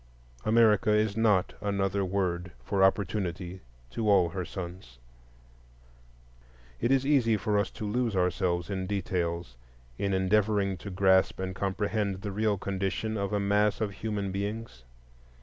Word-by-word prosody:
America 110 -2 +4
is 105 -1 +2
not 105 -5 +2
another 100 -1 0
word 90 -2 -1
for 100 -2 +1
Opportunity 95 -2 0 0.3
to 110 - -1
all 95 -4 +5
her 90 +2 -4
sons. 85 -9 -8 1.8
It 120 - +1
is 135 0 +3
easy 125 -7 +3
for 105 +2 +1
us 100 - 0
to 110 - -7
lose 115 0 0
ourselves 90 0 0
in 95 -1 -2
details 85 -7 -2 0.4
in 100 - 0
endeavoring 100 +1 +2
to 100 - -8
grasp 95 0 +3
and 95 0 -3
comprehend 100 +1 -2
the 100 - -3
real 105 0 +1
condition 100 +3 -2
of 100 -1 -2
a 105 - +1
mass 105 +1 +2
of 105 -2 -1
human 100 -1 -3
beings. 100 - -5
100 Hz, 140 wpm, -29 LUFS, 95-105 Hz, 1.8 s, all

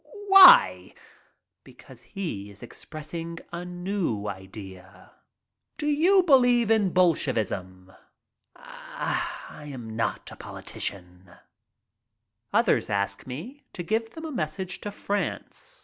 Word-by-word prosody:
"Why?" 390 +6 +8 0.7
"Because - - -16
he 155 - -6
is 100 +1 -13
expressing 165 +6 -8 0.2
a 170 +1 -4
new 180 - -3
idea." 95 -1 -10 0.7
"Do 295 - -4
you 340 +6 +4
believe 245 -7 +4
in 215 -4 +3
Bolshevism?" 105 - 0 0.6
"I - - -6
am 115 -4 -8
not 115 0 -2
a - - -9
politician." 90 -1 -7 1.2
Others - - +2
ask 100 +1 -2
me 210 - -8
to 175 - -5
give 225 +5 -2
them 325 0 -7
a 315 - -5
message 180 - -4
to 205 - -4
France. 205 - -4
170 Hz, 105 wpm, -26 LUFS, -, 1.2 s, Why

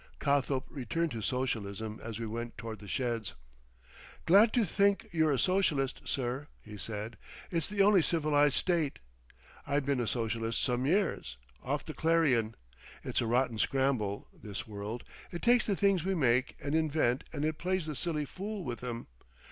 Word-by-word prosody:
Cothope 140 -2 +1
returned 150 +5 -1
to 115 - -4
Socialism 110 -3 -2
as 115 -2 -5
we 115 - -3
went 115 +2 -5
toward 115 -3 -6
the 105 - -11
sheds. 115 - -2 0.9
"Glad 205 +6 +7
to 240 -4 +3
think 200 +3 +2
you're 160 -2 +3
a 140 - +2
Socialist, 155 -7 +1
sir," 130 +2 -2
he 105 -1 -11
said, 110 +2 -5 0.3
"it's 165 -3 0
the 200 -1 +2
only 200 -2 +6
civilised 150 -4 +3
state. 170 -6 +1 0.7
I 140 0 +2
been 140 -2 0
a 120 - 0
Socialist 115 -1 -1
some 125 0 +1
years—off 125 - -1
the 155 - -6
Clarion. 145 -10 +2 0.5
It's - - 0
a 115 - -1
rotten 120 -1 +1
scramble, 130 -8 0
this 105 -2 -7
world. 105 +3 -5 0.3
It 175 - -6
takes 240 0 +4
the 200 - +2
things 195 -4 +3
we 190 +1 0
make 130 -4 +2
and 145 - -3
invent 155 -5 +2
and 150 -1 -2
it 155 0 -1
plays 185 -1 0
the 155 - -3
silly 150 0 -1
fool 200 +5 -5
with 120 -4 -5
'em. 120 -1 -4
135 Hz, 165 wpm, -31 LUFS, 115-165 Hz, 0.9 s, Glad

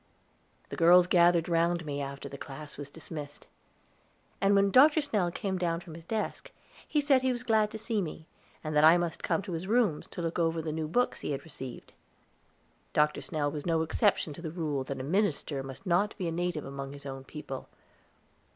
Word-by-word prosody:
The - - -5
girls 175 +2 +7
gathered 175 -2 +4
round 170 0 +1
me, 145 -1 -3
after 140 0 -5
the 140 - -8
class 145 +2 -8
was 145 -1 -7
dismissed; 150 -2 -8 1.0
and 200 +1 +4
when 200 0 +4
Dr. 295 +7 +7
Snell 210 - 0
came 190 +1 -3
down 170 -2 0
from 170 -2 -11
his 165 0 -11
desk, 220 - -3 0.4
he 300 - +1
said 280 -3 +4
he 260 0 +2
was 245 0 -3
glad 220 -3 +3
to 220 - -6
see 220 -1 -1
me, 160 -2 -6 0.4
and 155 -1 -3
that 150 - +5
I 160 +2 +8
must 175 -1 -2
come 195 - 0
to 190 - -7
his 170 +2 -4
rooms 215 -8 +2
to 175 - -6
look 165 +1 -2
over 165 -1 +1
the 160 -1 -3
new 155 0 -2
books 245 +10 0
he 150 - -2
had 140 0 -4
received. 135 -5 -9 1.0
Dr. 150 0 +2
Snell 145 -3 -1
was 150 +2 -5
no 165 -1 +2
exception 165 -1 +1
to 155 - -10
the 165 - -4
rule 155 -5 -2
that 135 0 -5
a - - -4
minister 155 -4 0
must 135 0 -9
not 195 +4 +1
be 185 -4 -2
a - - -1
native 175 -2 -2
among 135 0 -6
his 140 0 -12
own 135 -1 -6
people. 140 -2 -8
165 Hz, 205 wpm, -30 LUFS, 150-195 Hz, 1.0 s, I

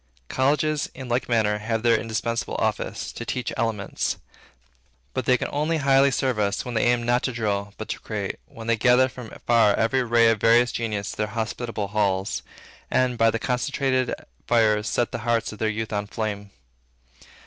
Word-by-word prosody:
Colleges, 150 +3 +1
in 130 -1 -7
like 120 +1 -1
manner, 105 -3 +2
have 110 +1 -2
their 120 -1 +5
indispensable 115 +1 -2
office, - - -2
to - - -7
teach 125 - -3
elements. 110 -3 -1 1.0
But 130 - -2
they 125 0 +4
can - - -3
only 155 +3 0
highly 135 -1 +4
serve 130 -2 0
us, 100 -1 0
when 125 - -5
they 110 - +1
aim 120 0 +2
not 120 +1 +2
to 130 - -1
drill, 105 -3 -2
but - - -6
to - - -3
create; - - -4
when 115 - -10
they 115 0 +2
gather 125 +3 +5
from 125 -3 -9 0.2
far 115 -4 +4
every 115 +4 +2
ray 115 -1 +4
of 110 - -1
various 120 +1 +5
genius 105 -3 -3
to - - -10
their 105 - 0
hospitable 110 -1 -3
halls, 100 -2 0 0.5
and, 130 -1 +2
by 115 -1 +4
the 115 - 0
concentrated 130 +1 0 0.3
fires, 110 -2 +3
set 120 - 0
the - - -3
hearts 115 -1 0
of 105 - -12
their 110 - +1
youth 110 0 -3
on 105 0 -2
flame. 100 -1 -4
115 Hz, 185 wpm, -24 LUFS, 110-125 Hz, 1.0 s, their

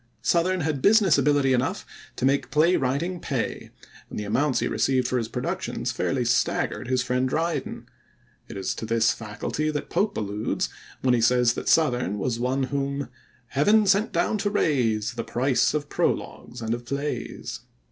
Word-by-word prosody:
Southerne 180 +2 +2
had 145 -3 -1
business 200 - +5
ability 140 -1 +3
enough 125 0 -1 0.3
to - - -1
make 140 +1 +1
play 165 +4 +3
writing 145 +8 -1
pay, 135 -8 -3 0.4
and - - -7
the 105 - -2
amounts 130 +7 +1
he - - +1
received 130 -2 +1
for 130 0 0
his 115 - -3
productions - - -3
fairly 130 -2 -1
staggered 120 0 0
his 130 -1 +1
friend 125 +1 0
Dryden. 165 +4 -2 0.6
It - - -8
is 95 -1 -2
to 110 - -5
this 115 0 +3
faculty 115 +8 -3
that 150 -1 -4
Pope 210 +2 0
alludes 105 +1 -2 0.3
when 130 -1 +4
he 120 - +2
says 120 0 +4
that - - -6
Southerne 125 - +2
was 115 +3 -2
one 130 +2 0
whom 140 0 -2 0.4
heaven 210 +10 +4
sent 200 +4 +3
down 215 - 0
to 205 - 0
raise 125 - +1
The 115 -1 -4
price 130 +5 +1
of 145 -1 -2
prologues 125 -3 -2
and 115 0 -1
of 120 +1 -4
plays. 140 +4 -4
130 Hz, 170 wpm, -25 LUFS, 120-155 Hz, 0.6 s, business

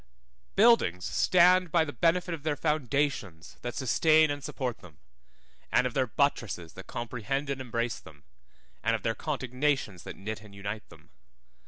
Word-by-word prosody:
BUILDINGS 200 - +4
stand 180 -1 +4
by 165 -1 +4
the 145 - -6
benefit 175 +1 +1
of 160 - -5
their 150 0 -1
foundations 140 - -1
that 120 -1 -5
sustain 155 +3 +4
and 145 -1 -5
support 125 -3 -3
them, 80 -5 -15 0.7
and - - +4
of 125 - -1
their 130 -2 +1
buttresses 115 - -1
that 95 - -11
comprehend 125 +4 -3
and 135 -1 -3
embrace 115 -2 -2
them, 75 -3 -16 0.6
and 115 0 +2
of 110 - -5
their 115 - +1
contignations 130 - -1
that - - -8
knit 105 +2 -6
and 105 -2 -14
unite 100 +2 -6
them. - - -18
130 Hz, 160 wpm, -29 LUFS, 110-150 Hz, 0.7 s, BUILDINGS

